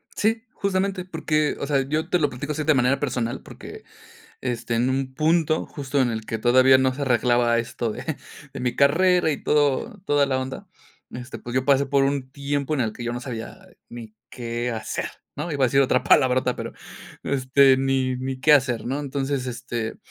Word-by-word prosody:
Sí, 225 +1 0
justamente, 195 -1 -1
porque, 155 -4 -1
o 140 - -3
sea, 140 -2 +2
yo 155 +5 -2
te 180 - +2
lo 150 - +2
platico 140 +4 -5
así 155 - -3
de 155 +1 +4
manera 130 0 +2
personal, 120 -4 -2
porque, - - -11 0.6
este, 120 -2 -3
en 120 +3 +1
un 130 0 -2
punto 160 +1 +2
justo 140 -1 -2
en 125 -2 +2
el 110 -1 -4
que 115 - -3
todavía 130 +3 +5
no 130 0 +2
se 140 - -5
arreglaba 120 -2 +2
esto, 115 -1 -3
de - - -8 0.5
de - - -7
mi 125 -1 -1
carrera 175 +4 +4
y 145 - -4
todo 150 - +1
toda 145 -4 +2
la 130 -1 0
onda, 130 +10 -6 0.4
este, 125 0 -8
pues 120 - -8
yo 130 0 +1
pasé 140 0 +3
por 135 0 +2
un 135 -2 -1
tiempo 140 +1 -2
en 140 - -1
el 110 -2 -2
que 120 - -8
yo 120 - -2
no 120 - -4
sabía 120 -3 -6 0.3
ni 115 -2 -10
qué 120 0 -4
hacer, 110 -2 -4 0.3
¿no? 150 +4 -4
Iba 140 -3 +1
a - - +5
decir 135 +2 +3
otra 130 -1 +2
palabrota 130 -2 +3
pero - - -6 0.5
este, 135 0 +4
ni 135 -1 0
ni 130 +1 -4
qué 150 +4 +4
hacer, 130 -5 +3
¿no? 135 +4 -2
Entonces, 140 -1 -2
este, 120 -2 -4
135 Hz, 200 wpm, -23 LUFS, 125-145 Hz, 0.6 s, todavía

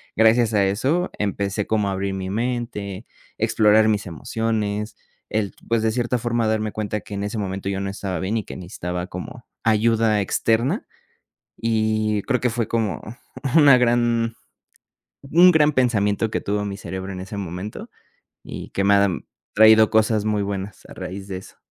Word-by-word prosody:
gracias 115 +1 +4
a 100 -2 +4
eso, 135 - 0
empecé 100 0 -1
como 105 -2 +1
a - - -1
abrir 95 0 -2
mi 95 -1 -4
mente, 115 -3 -3 0.3
explorar 110 -1 +4
mis 105 -1 0
emociones, 105 +3 -2 0.3
el, 105 -2 -1
pues, 115 -1 +1
de 110 - +2
cierta 120 +1 0
forma 120 -1 0
darme 110 -1 0
cuenta 105 0 -3
que - - -11
en 100 - -3
ese 105 +2 -4
momento 95 -1 -4
yo 95 -1 -2
no 100 - -2
estaba 95 -2 -4
bien 95 +6 -1
y 110 - -2
que - - -8
necesitaba 90 -1 -5
como 105 +7 -8 0.2
ayuda 110 -1 +3
externa 115 - 0 0.7
y 110 -2 0
creo 125 +2 0
que 125 - +1
fue 115 -1 -2
como 110 -4 -1 0.6
una 145 -5 +8
gran 120 -1 +2 0.9
un 175 +6 +6
gran 150 -2 +4
pensamiento 110 -4 +1
que - - -1
tuvo 105 +1 -1
mi 100 -1 -4
cerebro, 95 0 -6
en 90 - -6
ese 100 +3 -7
momento, 95 +2 -6 0.5
y - - -8
que 100 - -1
me 100 +1 +4
ha 100 0 +5 0.5
traído 110 0 +7
cosas 110 -1 +2
muy 105 -1 +1
buenas, 100 0 -5
a - - -11
raíz 95 +1 -7
de 95 -2 -4
eso. 95 - -12
110 Hz, 170 wpm, -22 LUFS, 100-115 Hz, 0.9 s, una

